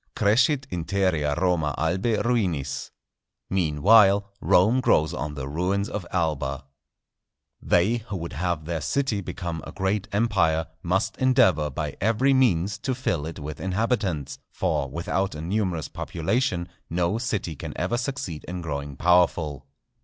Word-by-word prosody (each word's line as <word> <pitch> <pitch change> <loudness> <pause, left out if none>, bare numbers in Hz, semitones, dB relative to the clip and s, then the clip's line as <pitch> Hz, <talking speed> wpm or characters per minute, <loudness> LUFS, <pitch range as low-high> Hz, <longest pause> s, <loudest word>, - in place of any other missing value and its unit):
_ - - -50
"Crescit 130 +6 +3
interea 85 -4 0
Roma 85 -5 +1
Albæ 95 +7 0
ruinis"—Meanwhile 95 - +1
Rome 110 +8 +4
grows 80 -8 +3
on 75 -3 -4
the 65 -2 -5
ruins 90 +7 -1
of 95 -4 -5
Alba. 75 -6 -1 1.0
They 100 +7 +3
who 105 -4 -6
would 85 -1 -6
have 85 -1 -2
their 85 -1 -3
city 135 -7 0
become 85 -3 -5
a - - -8
great 95 +2 -1
empire, 95 -7 +2 0.2
must 95 +5 0
endeavour 125 - +3
by 75 +1 -4
every 115 +7 +3
means 100 -7 +2
to 130 -2 -2
fill 85 - -1
it 80 - -7
with 75 -1 -7
inhabitants; 95 - -1
for 70 - -1
without 85 +5 -2
a 75 - -6
numerous 90 -2 -1
population 90 +1 -1 0.2
no 90 +5 0
city 105 -8 -2
can - - -7
ever 120 - 0
succeed 130 - -4
in 90 0 -5
growing 70 -3 -4
powerful. 80 -6 +2
90 Hz, 140 wpm, -25 LUFS, 80-105 Hz, 1.0 s, Rome